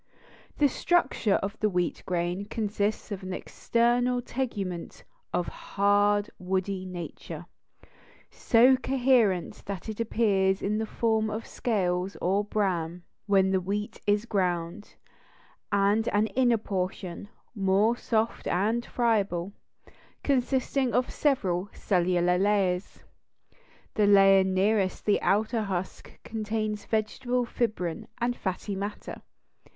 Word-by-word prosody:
The 295 - +5
structure 275 - +1
of 200 +2 -4
the 215 - +2
wheat 180 -2 -1
grain 180 +2 -1
consists 210 -1 -2
of 200 -1 -4
an 185 0 -5
external 240 +5 +1
tegument 210 -9 -4 0.3
of 175 0 -1
a - - -5
hard, 205 +1 +2
woody 185 +1 -2
nature, 175 -2 -7 0.9
so 250 +3 +5
coherent 250 -8 +1
that 200 0 -5
it 215 - -6
appears 200 -4 +1
in 210 +2 0
the 220 - -2
form 220 -1 0
of 220 +2 -4
scales 185 -4 -1
or 195 +3 +1
bran 180 -5 -1 0.2
when 190 -1 +4
the 190 -1 +2
wheat 205 +4 -4
is 205 +2 +2
ground, 180 -2 -2 0.8
and 200 +2 +2
an 205 +1 +2
inner 245 -2 +4
portion, 190 -2 -4 0.2
more 200 +2 +2
soft 225 -1 -1
and 215 +6 +1
friable, 200 -7 0 0.7
consisting 265 -1 +1
of 250 0 +1
several 200 - 0
cellular 180 -1 +1
layers. 195 -2 0 0.9
The 210 -1 +2
layer 195 -1 +7
nearest 190 +1 +1
the 205 - +2
outer 220 +3 +1
husk 190 -3 -5
contains 215 -1 -3
vegetable 245 +3 -1
fibrin 220 -4 -2
and 240 +1 0
fatty 195 0 -3
matter. 200 +2 -6
205 Hz, 115 wpm, -27 LUFS, 185-225 Hz, 0.9 s, layer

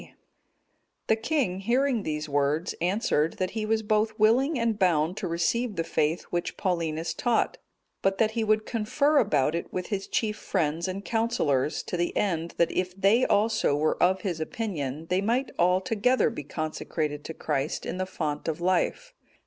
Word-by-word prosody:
D.] - - -16 0.9
The 220 - +3
king, 225 - -1
hearing 245 +3 +1
these 155 -3 -3
words, 145 +3 0
answered, 175 -4 +1
that 185 -1 -1
he 215 -1 -3
was 220 0 +1
both 215 +1 +1
willing 250 +8 +3
and 230 -3 0
bound 170 -2 +2
to 210 -3 -3
receive 205 +7 0
the 165 - 0
faith 160 +1 0
which 175 0 -2
Paulinus 165 -3 -1
taught; 235 +7 0 0.4
but 195 0 +1
that 220 -1 +2
he 225 0 -1
would 215 0 +2
confer 280 +6 +2
about 150 - +2
it 170 - -4
with 180 -1 -4
his 200 -3 -3
chief 215 -2 -1
friends 170 -4 -1
and 195 +2 -5
counsellors, 160 - 0
to 180 - -4
the 175 0 -1
end 170 -4 -1
that 170 - +3
if 185 +1 -2
they 210 +6 +4
also 210 -8 +2
were 155 +2 0
of 185 +1 +3
his 180 -5 -3
opinion, 155 - -3
they 185 +1 +2
might 240 +6 0
all 180 +2 +4
together 225 +5 +2
be 185 - -6
consecrated 155 0 -3
to 160 - -6
Christ 150 0 -2
in - - -4
the 185 - -1
font 155 -5 -3
of 160 -1 -2
life. 185 - 0
185 Hz, 180 wpm, -27 LUFS, 160-220 Hz, 0.9 s, they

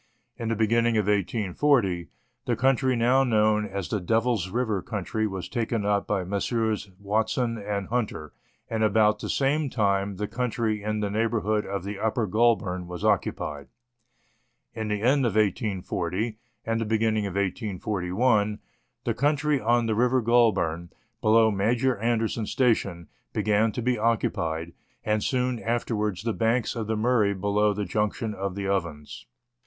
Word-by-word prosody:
In 115 -1 -4
the 115 - +1
beginning 115 +1 +2
of 105 - +2
1840, 105 -1 +1 0.4
the 120 -3 +1
country 130 +1 +2
now 125 +3 +3
known 110 -3 +2
as 100 -2 -4
the 105 - -2
Devil's 110 -1 +1
River 110 -2 -1
country 110 +1 -2
was 95 -3 -5
taken 115 -3 -2
up 100 -1 +1
by 100 -3 0
Messrs. 105 +2 -1
Watson 110 +3 -1
and 100 -1 -3
Hunter; 110 -10 -2 0.3
and 110 -1 -1
about 105 0 +3
the - - -5
same 140 +2 +1
time 100 -4 0
the 105 +2 -3
country 115 -2 -1
in 105 +1 -2
the 100 -1 -1
neighbour 115 +1 0
hood 105 +1 0
of 100 -1 -3
the 100 0 -5
Upper 110 +1 0
Goulburn 105 -4 +1
was 90 +3 -5
occupied. 85 -8 -1 1.1
In 110 -1 -4
the 105 0 -2
end 135 +3 +3
of 115 -5 0
1840, 100 0 -1 0.3
and 115 0 0
the - - -1
beginning 110 -1 +1
of 95 - -6
1841, 105 +2 0 0.5
the 115 - 0
country 145 +2 +1
on 120 +2 +2
the 110 - 0
River 125 +3 +2
Goulburn, 105 -8 +2 0.3
below 110 0 +5
Major 120 +6 +1
Anderson's 115 0 -1
station, 100 - +1 0.3
began 110 +1 +2
to 120 - -3
be 125 -1 +1
occupied, 85 -7 -1 0.3
and 105 -1 0
soon 125 -2 0
afterwards 110 -4 -1
the 115 -1 -1
banks 115 +2 0
of 115 -3 -3
the 110 0 -1
Murray 110 -3 +2
below 100 +2 +1
the 105 0 -2
junction 105 +4 -1
of 100 -1 -4
the 100 -1 -3
Ovens. 85 -10 -3
110 Hz, 155 wpm, -26 LUFS, 100-115 Hz, 1.1 s, below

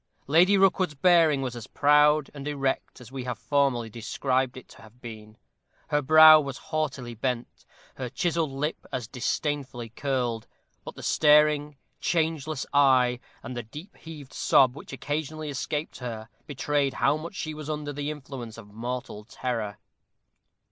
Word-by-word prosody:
Lady 175 +7 +5
Rookwood's 185 -4 +2
bearing 160 -3 +4
was 125 -2 -4
as 120 -2 -8
proud 150 0 +4
and 140 -1 -7
erect 135 -2 -2
as 125 -1 -13
we 135 -1 -5
have 125 -2 -3
formerly 135 -5 +1
described 130 +4 -2
it 130 - -11
to - - -16
have 110 +2 -17
been 110 -3 -10 0.5
her 150 - +2
brow 155 +2 +9
was 140 -3 -5 0.2
haughtily 140 -6 -2
bent 120 +1 -4 0.3
her 130 -2 -4
chiselled 170 -1 -1
lip 140 +4 -3
as 125 -4 -4
disdainfully 130 -1 -3
curled; 120 -2 -2 0.4
but - - -9
the - - -10
staring, 150 -1 +4 0.2
changeless 160 -3 -1
eye, 130 -3 +4 0.2
and 130 - -6
the 120 - -3
deep 150 - -11
heaved 150 -5 -11
sob 130 -2 +4
which - - -11
occasionally 150 +2 -4
escaped 150 +2 -4
her, 115 -3 -6 0.2
betrayed 145 -1 -1
how 140 +4 +2
much 165 +5 -7
she 155 -3 -4
was 155 0 -8
under 150 -1 -3
the 145 +1 -3
influence 130 -6 -7
of 105 -3 -13
mortal 120 -1 -5
terror. 110 -3 -4
140 Hz, 155 wpm, -26 LUFS, 125-150 Hz, 0.5 s, brow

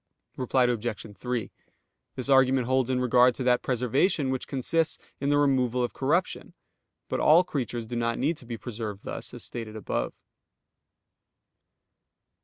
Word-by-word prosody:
_ - - -10
Reply 130 0 +2
Obj. 115 -3 -2
3: 125 -1 -3 0.6
This 130 - -2
argument 135 -2 +4
holds 130 0 +1
in 130 -1 +1
regard 125 0 +4
to 130 - -4
that 125 -1 +3
preservation 130 - +1
which 130 -1 -3
consists 155 +4 0 0.2
in 140 - -1
the 145 - +3
removal 130 -4 +2
of 120 - -2
corruption: 165 +7 -1 0.5
but - - -2
all 165 +4 +6
creatures 125 -8 -3
do 120 +2 -6
not 115 0 0
need 155 +6 +1
to 125 - -12
be 115 -1 -5
preserved 110 -4 -6
thus, - - -4
as - - -8
stated 110 -2 -5
above. 110 - -4
125 Hz, 155 wpm, -27 LUFS, 120-135 Hz, 0.6 s, all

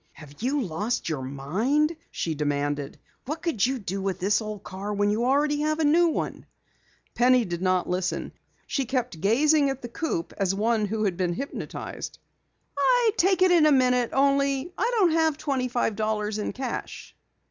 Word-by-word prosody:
"Have 145 -2 -14
you 270 +5 0
lost 205 +5 -2
your 150 -4 -2
mind?" 205 - 0
she 165 - -3
demanded. 145 -1 -2 0.3
"What 305 +5 -5
could 315 - 0
you 265 +2 +2
do 195 -3 -4
with 190 -1 -2
this 205 +4 +2
old 215 -2 -6
car 195 +2 -6
when 205 0 +1
you 225 +3 0
already 290 +3 +2
have 310 0 0
a 320 - 0
new 330 +4 +4
one?" 325 - -3 0.7
Penny 250 -1 +4
did 175 -1 -4
not 185 -1 +1
listen. 180 -2 -2 0.3
She 275 - -1
kept 245 - -2
gazing 285 - +3
at 270 -1 -5
the - - -4
coupe 235 - -3
as 195 -1 +1
one 215 +1 +1
who 215 +1 -2
had 190 -4 0
been 180 -2 0
hypnotized. 275 +10 -6 0.6
"I'd 470 - +3
take 375 -1 +3
it 370 - +5
in 330 -3 +6
a - - +5
minute, 250 -3 +3
only 275 +3 +1
I 460 +5 0
don't 370 -6 +4
have 320 -2 +2
twenty 270 -5 -1
five 240 -3 -1
dollars 215 0 -1
in 210 - -2
cash." 260 0 -6
240 Hz, 180 wpm, -26 LUFS, 190-290 Hz, 0.7 s, in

